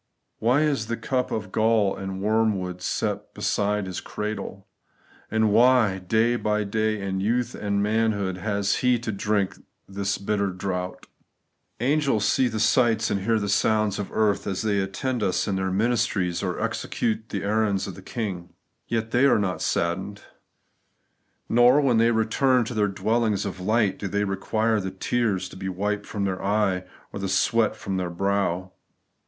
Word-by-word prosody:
Why 125 +7 +3
is 140 -8 0
the 115 0 -2
cup 125 +2 -1
of 100 -3 -4
gall 110 -3 +2
and 95 0 -5
wormwood 105 -4 0
set - - -3
beside 105 0 0
His 95 -1 -5
cradle? 105 -2 -5 0.6
and 110 -1 +2
why, 115 -4 +4
day 110 +6 +2
by 105 -2 0
day, 110 +1 -1
in 95 -1 -2
youth 120 +4 0
and 100 -1 -1
manhood, 105 -3 0
has 100 +1 0
He 125 -1 +3
to 115 -1 -4
drink 100 -1 -1 0.3
the 100 0 -2
bitter 100 -1 +1
draught? 90 -1 -4 0.7
Angels 135 -3 +1
see 130 +3 +3
the 110 -2 -3
sights 110 0 +3
and 100 - 0
hear 115 +3 +2
the 100 -1 -2
sounds 105 0 +1
of 100 - -4
earth, 105 -2 +1
as 95 +1 -2
they 105 -2 +1
attend 115 +6 -2
us 95 -3 0
in 100 - 0
their 95 0 -1
ministries, 105 -4 0
or - - -2
execute 110 0 -2
the 100 - -3
errands 105 -1 +1
of 95 - -6
their 95 - -11
King: 95 -4 -5 0.4
yet 115 -1 -2
they 125 +3 +4
are 140 - +5
not 90 -5 -1
saddened; 95 +4 -1 1.2
nor, 120 +4 +5
when 135 -5 +3
they 115 +1 +4
return 120 +3 +2
to 120 - -5
their, 105 -2 +2
dwellings 110 0 0
of 95 -2 -5
light, 105 +1 +1
do 100 - -3
they 100 +2 0
require 110 +3 0
the 95 - -3
tears 95 -1 -1
to - - -12
be 95 0 -5
"vfiped 105 +3 -2
from 100 -2 -2
thfeir 95 -1 -2
eye, 100 -3 +1 0.3
or - - -5
the 95 -1 -3
sweat 110 +3 +2
from 100 -3 -4
their 90 -1 -2
brow. 95 0 -1
105 Hz, 170 wpm, -25 LUFS, 95-115 Hz, 1.2 s, are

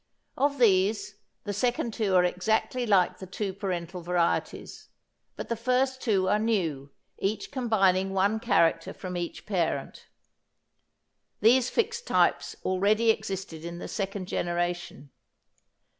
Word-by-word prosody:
Of 280 +1 +1
these 205 -2 +2 0.2
the 205 - -3
second 240 +1 -1
two 205 -4 0
are 180 - +6
exactly 220 +7 0
like 190 -4 +3
the 190 - -8
two 195 +1 -3
parental 180 -3 -4
varieties, 175 0 -2 0.5
but - - -6
the 235 - -1
first 255 +3 0
two 195 -5 +1
are 210 +2 +2
new, 170 -11 -1 0.3
each 200 +1 -2
combining 195 -7 +2
one 200 +3 +1
character 165 -7 +2
from 185 -1 -7
each 175 -1 -5
parent. 170 -8 -2 1.3
These 245 +4 +5
fixed 470 +1 -1
types - - +2
already 210 +5 +3
existed 195 -7 -5
in 170 0 -6
the - - -6
second 195 -2 -4
generation. 175 -6 -3
195 Hz, 130 wpm, -27 LUFS, 180-225 Hz, 1.3 s, are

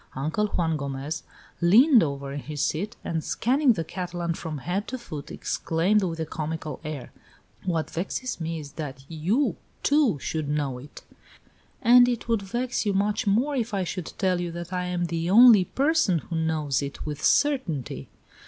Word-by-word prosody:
Uncle 160 +10 0
Juan 165 -5 0
Gomez 140 +2 -4 0.4
leaned 230 - +7
over 140 -2 -3
in 145 - -3
his 150 +1 -7
seat, 200 +9 -2
and 160 -2 -2
scanning 260 +2 +2
the 165 - -3
Catalan 175 0 -3
from 160 -2 -5
head 180 +9 -3
to 255 - -4
foot, 155 - -8
exclaimed 180 +6 0
with 170 -4 -2
a 160 - -1
comical 155 -2 -5
air: 150 -5 -6 0.5
"What 165 -4 -1
vexes 195 +5 -3
me 165 0 -3
is 145 -2 -9
that 135 -4 -6
you, 180 - 0 0.3
too, 285 - +3
should 150 +1 -3
know 145 -4 -1
it!" 140 +4 -12 0.8
"And 245 0 +7
it 240 -1 -3
would 230 -3 +1
vex 240 +5 -2
you 205 -2 0
much 205 +2 0
more 245 +9 +2
if 230 -4 -1
I 195 - 0
should 180 -1 -5
tell 185 -2 +1
you 175 -1 -3
that 175 +1 -6
I 180 0 -1
am 180 -1 -1
the 165 0 -2
only 220 -2 +8
person 280 - +2
who 165 +2 -6
knows 155 -4 0
it 140 0 -6
with 150 -2 -5
certainty." 250 - +1
175 Hz, 175 wpm, -26 LUFS, 155-215 Hz, 0.8 s, only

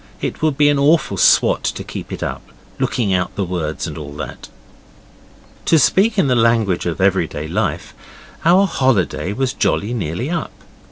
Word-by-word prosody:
It - - -4
would 155 -3 +1
be 145 - +4
an 145 -1 +2
awful 155 +4 +2
swot - - +3
to - - -3
keep - - -8
it - - -5
up - - -4 0.4
looking 105 -6 0
out 90 -1 -1
the 100 -1 -1
words 80 -5 -3
and - - -6
all 70 -1 -8
that.) 75 - -8 1.2
To 165 - +4
speak 205 +8 +3
in 190 - +3
the 130 - +2
language 115 -7 +2
of 85 +2 -3
everyday 90 -5 0
life, 105 +6 -2 0.5
our 180 +4 +5
holiday 100 - 0
was 130 +3 -1
jolly 105 +4 0
nearly 105 - -3
up. 170 -2 -2
110 Hz, 170 wpm, -18 LUFS, 90-140 Hz, 1.2 s, our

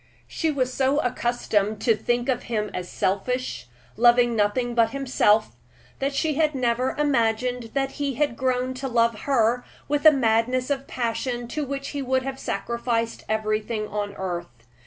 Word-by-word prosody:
She 325 - -2
was 255 -4 0
so 270 +2 +2
accustomed 220 -4 0
to 225 -3 +3
think 240 +3 -1
of 260 -3 -1
him 210 -2 -1
as 180 0 -5
selfish, 200 - -2 0.3
loving 240 0 +5
nothing 230 +4 +1
but 230 -1 +3
himself, 235 -5 +2 0.4
that 275 +1 -1
she 305 +1 0 0.2
never 250 0 0
imagined 245 -4 +1
that 270 -1 0
he 280 -2 -3
had 290 -3 0
grown 255 0 0
to 265 +1 -4
love 235 -2 +3 0.2
her 245 -2 +3 0.2
with 290 0 0
a - - +11
madness 250 0 +1
of 275 -1 -2
passion 240 0 -2
to 305 - -2
which 275 0 -4
he 285 - -4
would 260 0 0
have 270 0 -5
sacrificed 235 -1 -2
everything 215 0 -1
on 205 -1 -3
earth. 175 -10 -5
245 Hz, 155 wpm, -24 LUFS, 225-265 Hz, 0.4 s, a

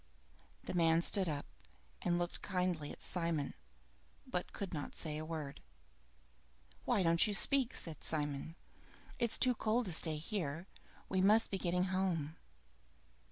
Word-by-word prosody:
The - - -5
man 165 -1 +4
stood 190 -3 +3
up 145 -2 -3 0.6
and 175 -1 +1
looked 175 0 -3
kindly 180 -5 -1
at - - -9
Simon, 165 -5 0 0.7
but 180 -9 -3
could 200 -3 -5
not 145 -3 -5
say 155 -1 -2
a - - -5
word. 155 -4 -6 1.2
"Why 195 - +2
don't 165 +1 +4
you 210 - +2
speak?" 265 +3 +5
said 160 -4 +1
Simon. 150 +1 -2 0.6
"It's 235 -2 +2
too 255 - +3
cold 230 +1 0
to 185 - -4
stay 160 -1 +1
here, 165 -2 -3 0.4
we 190 -1 0
must 215 +4 +4
be 195 - -2
getting 180 0 +1
home. 170 -5 -1
175 Hz, 145 wpm, -35 LUFS, 155-195 Hz, 1.2 s, speak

